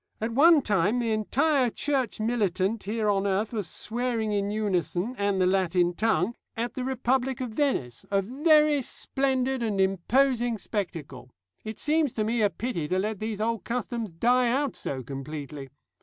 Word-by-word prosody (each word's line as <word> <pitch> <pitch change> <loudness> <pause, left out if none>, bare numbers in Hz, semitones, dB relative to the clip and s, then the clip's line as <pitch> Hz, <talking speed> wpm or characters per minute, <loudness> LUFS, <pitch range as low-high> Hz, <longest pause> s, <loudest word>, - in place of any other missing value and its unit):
At 225 +2 -2
one 305 +2 +6
time 205 +2 +1
the 235 -2 0
entire 255 +5 +2
Church 265 -2 -1
militant 215 -2 0
here 215 +1 -1
on 200 -1 +2
earth 200 +4 0
was 210 -5 -2
swearing 230 -1 -2
in 200 -1 0
unison, 205 0 -1
and 200 -3 0
the 185 - +3
Latin 180 -2 +2
tongue, 215 0 +1 0.2
at 235 +1 -2
the 255 - -4
Republic 260 0 0
of 250 -3 -4
Venice 215 - -1
a 195 -1 +1
very 300 - +3
splendid 265 0 -1
and 215 -4 -1
imposing 235 +6 +2
spectacle. 160 - -5 0.3
It 220 -1 -7
seems 300 -3 +1
to 215 - -1
me 225 +2 0
a 205 - +4
pity 200 -9 -3
to 185 - 0
let 210 +1 -2
these 215 -1 -4
old 225 -2 -1
customs 235 -3 -3
die 245 +8 +2
out 275 +2 0
so 130 -2 -5
completely. 140 +1 -7
220 Hz, 165 wpm, -27 LUFS, 195-250 Hz, 0.3 s, one